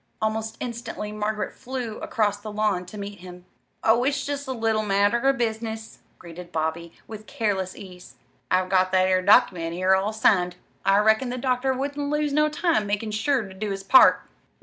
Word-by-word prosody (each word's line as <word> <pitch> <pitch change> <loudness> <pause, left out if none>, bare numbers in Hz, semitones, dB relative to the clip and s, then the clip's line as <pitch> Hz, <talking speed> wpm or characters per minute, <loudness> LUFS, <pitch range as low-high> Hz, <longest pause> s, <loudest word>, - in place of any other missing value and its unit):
Almost 220 0 -2
instantly 235 -3 -5
Margaret 210 0 -3
flew 245 -4 -6
across 205 -2 0
the 210 +1 -8
lawn 205 -4 -1
to 210 - -10
meet 200 0 -7
him. 180 0 -12 0.4
"Oh, 230 +2 +4
it's 275 +2 0
jest 285 -1 -4
a - - -3
little 225 -3 0
matter 205 +2 +2
of 270 +2 +2
business," 220 -1 -4 0.2
greeted 175 0 -11
Bobby, 160 +1 -3
with 215 -1 -10
careless 200 -7 -2
ease. 180 -3 -12 0.3
"I've 185 0 +2
got 185 -1 +2
that 185 0 +4
'ere 185 0 +2
document 185 -5 +3
here 185 +1 +2
all 195 +3 +1
signed. 180 -5 +2 0.3
I 195 0 +4
reckoned 220 +4 +3
the 250 - -4
doctor 255 +1 0
wouldn't 285 +2 -3
lose 300 -1 0
no 300 +1 +3
time 300 - 0
makin' 210 +2 -2
sure 235 +4 0
ter 195 -2 -10
do 205 +2 -4
his 195 0 -4
part." 260 +7 +6
215 Hz, 185 wpm, -24 LUFS, 190-245 Hz, 0.4 s, part